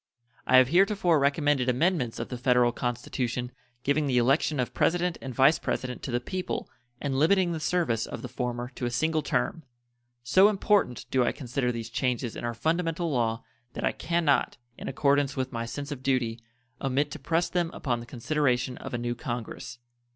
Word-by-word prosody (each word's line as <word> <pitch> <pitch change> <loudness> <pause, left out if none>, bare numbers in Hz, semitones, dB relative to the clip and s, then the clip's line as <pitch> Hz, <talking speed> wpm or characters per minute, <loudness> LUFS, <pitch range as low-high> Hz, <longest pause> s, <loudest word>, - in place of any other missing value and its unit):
I 130 - +6
have 130 0 +6
heretofore 180 -2 +3
recommended 140 -2 +2
amendments 130 -2 +1
of 115 - -4
the 125 - -4
Federal 125 -1 +4
Constitution 125 0 -3 0.3
giving 145 +1 +1
the 130 -2 +1
election 135 +4 +2
of 125 - -1
President 175 0 +1
and 135 - -5
Vice 135 +5 +4
President 125 -1 -3
to - - -5
the 120 0 0
people 185 +9 -4 0.3
and 135 -2 -1
limiting 180 +3 +4
the 165 - -2
service 155 -10 0
of - - -7
the - - -4
former 125 -1 -3
to 125 - -3
a - - -1
single 155 +6 +1
term. 160 +2 -1 0.6
So 190 +11 +6
important 205 - +1
do 130 -1 +3
I - - +2
consider 125 -1 -2
these 115 -2 -6
changes 125 -2 -1
in - - -6
our 120 0 -2
fundamental 165 +4 0
law 115 -3 0 0.3
that - - -5
I - - +3
can 170 0 -1
not, 140 -2 +2 0.2
in - - -8
accordance 140 0 +2
with 130 0 -2
my 115 -2 -3
sense 140 +4 -6
of 140 -3 -5
duty, 125 -4 0 0.4
omit 140 +2 0
to 155 - -6
press 165 +5 +1
them 175 -2 0
upon 120 -4 -2
the 120 - -10
consideration 125 -1 0
of - - -5
a - - 0
new 120 0 -2
Congress. 120 0 -6
130 Hz, 190 wpm, -27 LUFS, 120-155 Hz, 0.6 s, I